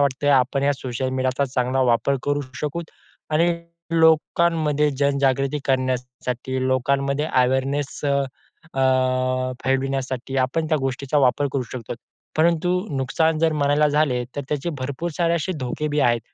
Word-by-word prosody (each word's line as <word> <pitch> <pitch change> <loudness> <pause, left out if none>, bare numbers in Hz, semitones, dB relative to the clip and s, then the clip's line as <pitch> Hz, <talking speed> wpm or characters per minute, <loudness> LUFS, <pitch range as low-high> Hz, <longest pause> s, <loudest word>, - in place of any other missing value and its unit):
वाटतंय 140 +1 +1
आपण 135 +1 +2
या 145 +1 +3
सोशल 130 -1 -3
मीडियाचा 130 +1 0
चांगला 130 0 0
वापर 135 +4 +2
करू 145 0 +1 0.2
शकतो. 160 +3 -3 0.5
आणि 165 +3 +3 0.5
लोकांमध्ये 160 -2 +3
जनजागृती 140 0 +1
करण्यासाठी 130 0 -2
लोकांमध्ये 140 +3 +1
अवेयरनेस 130 +2 0 0.7
अ, 130 -1 +1
फैलविण्यासाठी 135 -1 -1
आपण 160 +4 -2
त्या 155 -2 +2
गोष्टीचा 135 +2 -1
वापर 135 +1 +3
करू 135 - 0
शकतो. 125 -3 -6 0.4
परंतु 170 +2 +2 0.3
नुकसान 155 +5 +1
जर 160 0 +2
म्हणायला 145 0 +2
झाले 145 -5 +1
तर - - -1
त्याचे 150 +3 -2
भरपूर 140 +6 -3
सारे 170 -1 +2
असे 175 +3 -1
धोके 130 +4 -2
भी 150 0 0
आहेत. 120 -3 +3
135 Hz, 130 wpm, -22 LUFS, 130-150 Hz, 0.7 s, या